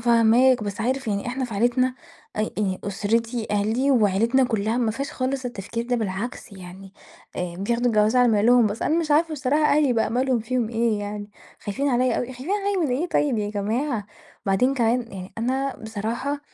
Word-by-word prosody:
فاهماك، 235 +1 +4
بس 205 +1 -4
عارف 260 +2 -1
يعني 200 0 -2
إحنا 260 +2 -2
في 235 -4 -6
عيلتنا 245 +4 +2 0.4
أ 215 - 0
ي 205 -3 -1
أُسرتي، 225 +3 -1
عيلتي 220 +7 +1
وعيلتنا 230 +2 +3
كُلّها 220 -2 -1
ما 235 -3 +1
فيهاش 275 +6 -4
خالص 260 0 -2
التفكير 230 0 -4
ده، 245 0 +1
بالعكس 215 +1 -4
يعني 190 +1 -11 0.4
آآ، 175 -1 -4
بياخدوا 235 +5 0
الجواز 215 0 +3
على 250 -1 +5
مهلهم. 230 +2 +4
بس 210 +2 -3
أنا 315 +3 +2
مش 315 -2 -4
عارفة 315 +2 +3
بصراحة 295 +1 +1
أهلي 295 -4 +3
بقى 225 -2 +1
مالهم، 255 +1 +1
فيهم 240 0 -1
إيه 230 -2 0
يعني، 205 0 -6 0.3
خايفين 270 +8 -2
عليَّ 250 -1 +2
أوي، - - -1
خايفين 260 +6 -8
عليَّ 405 0 0
من 250 -2 0
إيه 345 +5 -2
طيب 285 -8 +1
يا 205 -1 -2
جماعة؟! 215 +2 -2 0.4
وبعدين 250 +8 +2
كمان 235 -1 0
يعني 185 -1 -8
أنا 265 +3 -1
بصراحة 225 +6 -4
235 Hz, 185 wpm, -24 LUFS, 210-260 Hz, 0.4 s, على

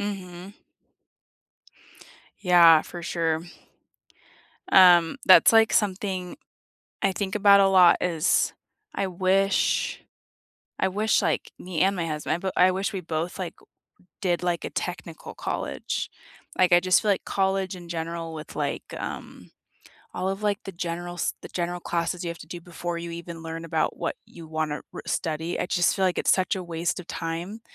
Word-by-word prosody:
Mhm. 190 -2 -6 1.9
Yeah, 170 -4 +7
for 175 - -9
sure. 165 -2 -1 1.3
Um, 175 0 +7
that's, 185 +1 +8
like, 225 -1 +5
something 190 -3 -1 0.7
I 195 - +2
think 195 0 -3
about 200 -1 +6
a 195 - +5
lot 180 -2 +6
is, 165 -4 +1 0.4
I 195 - -1
wish 190 +2 +1 0.8
I - - +2
wish, 210 +2 +1
like, 160 -3 -1
me 180 -3 -4
and 195 +1 +3
my 170 -2 -2
husband, 155 -1 -2
I - - -2
b 190 +1 -3
I 185 +1 +5
wish 195 +3 -2
we 190 - -3
both, 165 +2 -4
like, 175 -3 -4
w - - -23 0.5
did, 175 -3 0
like, 175 -1 -1
a - - -6
technical 175 -2 -6
college. - - -4 0.5
Like, 180 -1 +4
I 175 - +6
just 185 +1 +3
feel 215 - +1
like 195 - -3
college 190 -1 0
in 175 -2 -11
general 165 0 -4
with, 155 -1 -9
like, - - -2 0.2
um, - - -8 0.7
all 185 - -2
of, 195 +2 -4
like, 205 -1 +1
the 195 - -5
general 175 0 -5
s 175 - -1
the - - -7
general 175 0 -3
classes 170 +1 -2
you 170 - -3
have 170 - -11
to - - -11
do 175 - -7
before 175 0 -5
you 170 0 -6
even 170 -1 -8
learn 165 0 -6
about 160 -1 -1
what - - -3
you 165 -2 -12
want 155 -1 -2
to 150 - -4
r - - -7
study, 160 0 -2
I - - -1
just 175 -2 +2
feel 190 - +1
like 180 - 0
it's - - +3
such 185 0 0
a 185 - -4
waste 170 +1 -2
of 180 - -9
time, 170 +7 -5
175 Hz, 175 wpm, -25 LUFS, 170-190 Hz, 1.9 s, that's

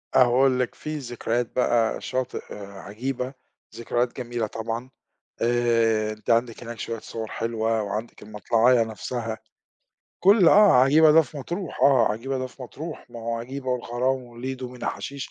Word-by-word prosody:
أقول 130 +1 +4
لِك 125 - -1
في 155 0 -5
ذكريات 120 -2 -3
بقى، 120 -3 +2
شاطئ 130 -1 -3
آآ 100 -1 -9
عجيبة، 125 +5 -4 0.4
ذكريات 120 +1 -1
جميلة 120 -3 -3
طبعًا، 115 +3 -5 0.5
آآ 115 -2 +2
أنتِ 110 -1 -9
عندِك 115 0 +1
هناك 115 0 -8
شويّة 115 -1 -4
صور 110 0 -6
حلوة، 115 0 -1
وعندِك 105 +3 -5
المطلَعيّة 115 +3 +3
نفسها، 110 0 -4 0.9
كُلّ 195 -3 +7
آه، 205 +2 +7
عجيبة 145 +5 +6
ده 160 +1 +7
في 150 -1 -10
مطروح 170 +4 -5
آه، 135 -4 +5
عجيبة 130 +5 -3
ده 130 - -2
في 130 +1 -13
مطروح، 155 +6 -8
ما 115 - -8
هو 115 +1 -2
عجيبة 130 +3 -7
والغرام 125 +1 -1
وليدو 125 +2 -6
ومينا 125 -1 -5
حشيش 140 -2 -5
120 Hz, 155 wpm, -25 LUFS, 115-130 Hz, 0.9 s, كُلّ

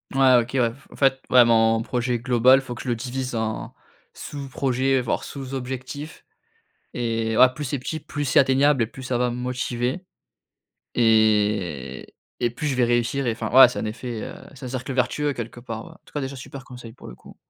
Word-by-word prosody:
Ouais, 130 -2 +6
OK, 120 - -7
ouais. 120 -3 +2
F 135 +2 -20
en - - -12
fait, 135 -1 +2
ouais, 125 -1 +7
mon 115 -1 +3
projet 120 0 -1
global, 125 +2 +4
faut 130 -2 -7
que 120 - -8
je - - -9
le 120 - +1
divise 125 +1 -4
en 110 -1 -3 0.4
sous-projets, 135 -2 -1
voire 120 - -2
sous-objectifs 135 +2 -6 0.7
et 115 -2 -1
voilà, 130 +3 +7
plus 145 +3 -6
c'est 140 +2 -2
petit, 155 +5 -4
plus 145 0 -5
c'est 130 - +4
atteignable 135 0 +3
et 110 - -2
plus 130 +3 -11
ça 130 -2 -1
va 125 0 +1
me - - -5
motiver 125 +5 -3 0.9
et 105 - +1 0.3
et 120 - +2
plus 140 +6 -4
je 140 - 0
vais 125 -1 +3
réussir 120 +3 0
et 115 - +1
enfin, 110 - -4
voilà, 130 0 +9
c'est 125 - -6
un - - -3
effet, 110 +1 -5
heu - - -7 0.2
c'est 130 - -9
un - - -5
cercle 130 +1 -4
vertueux 140 +3 0
quelque 120 -1 -7
part, 115 -2 -7
ouais. - - -12
En - - -18
tout - - -20
cas 145 - -2
déjà, 135 +1 -5
super 135 +1 -9
conseil, 125 -3 -11
pour - - -15
le - - -9
coup. - - -16
125 Hz, 215 wpm, -23 LUFS, 115-135 Hz, 0.9 s, voilà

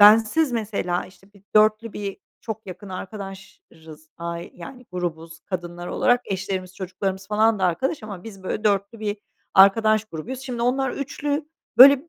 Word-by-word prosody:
bensiz 225 +7 +7
mesela, 200 -6 -1
işte, 190 +2 -20
bir 200 -1 -20
4'lü 215 +1 +4
bir 200 -2 -4 0.2
çok 220 -2 -6
yakın 190 +2 -8
arkadaşız 185 -5 -9
ai 170 0 -5
yani, 250 +8 -10
grubuz 165 -2 -4
kadınlar 175 -2 -5
olarak 245 +6 +3
eşlerimiz 190 -1 -3
çocuklarımız 190 +1 -3
falan 215 0 +3
da 185 - +1
arkadaş 200 - 0
ama 200 -3 -7
biz 195 -4 -10
böyle 210 +3 -3
4'lü 200 +2 +1
bir 210 -1 -1 0.4
arkadaş 215 +2 +6
grubuyuz. 225 +8 -6
Şimdi 250 -3 -4
onlar 265 +2 +2
3'lü 290 +2 -2 0.3
böyle, 280 +4 +9
200 Hz, 150 wpm, -24 LUFS, 185-225 Hz, 0.4 s, böyle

